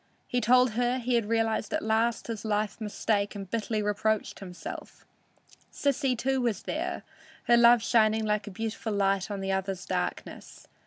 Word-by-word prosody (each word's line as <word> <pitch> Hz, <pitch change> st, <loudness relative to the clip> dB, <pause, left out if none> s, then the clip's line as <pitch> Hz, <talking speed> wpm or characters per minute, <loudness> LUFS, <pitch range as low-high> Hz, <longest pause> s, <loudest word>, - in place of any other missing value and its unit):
He 245 Hz, -, -1 dB
told 250 Hz, +2 st, +5 dB
her 245 Hz, +3 st, 0 dB
he 245 Hz, -1 st, +1 dB
realized 225 Hz, 0 st, 0 dB
at -, -, -1 dB
last 225 Hz, +2 st, +1 dB
his 225 Hz, -3 st, -5 dB
life 215 Hz, 0 st, -1 dB
mistake 210 Hz, -1 st, -1 dB
and 195 Hz, -1 st, -6 dB
bitterly 220 Hz, +1 st, -2 dB
reproached 210 Hz, +1 st, -1 dB
himself. 180 Hz, -2 st, -9 dB, 0.7 s
Sissy, 270 Hz, -2 st, 0 dB
too, 265 Hz, +2 st, 0 dB
was 230 Hz, -6 st, -1 dB
there, -, -, -3 dB, 0.4 s
her 240 Hz, -, +5 dB
love 235 Hz, -1 st, +6 dB
shining 220 Hz, -1 st, +3 dB
like 210 Hz, -1 st, -1 dB
a -, -, -3 dB
beautiful 220 Hz, +2 st, -4 dB
light 195 Hz, 0 st, +1 dB
on 200 Hz, -1 st, -4 dB
the 195 Hz, 0 st, -2 dB
other's 190 Hz, -1 st, -2 dB
darkness. -, -, -5 dB
220 Hz, 160 wpm, -28 LUFS, 205-235 Hz, 0.7 s, love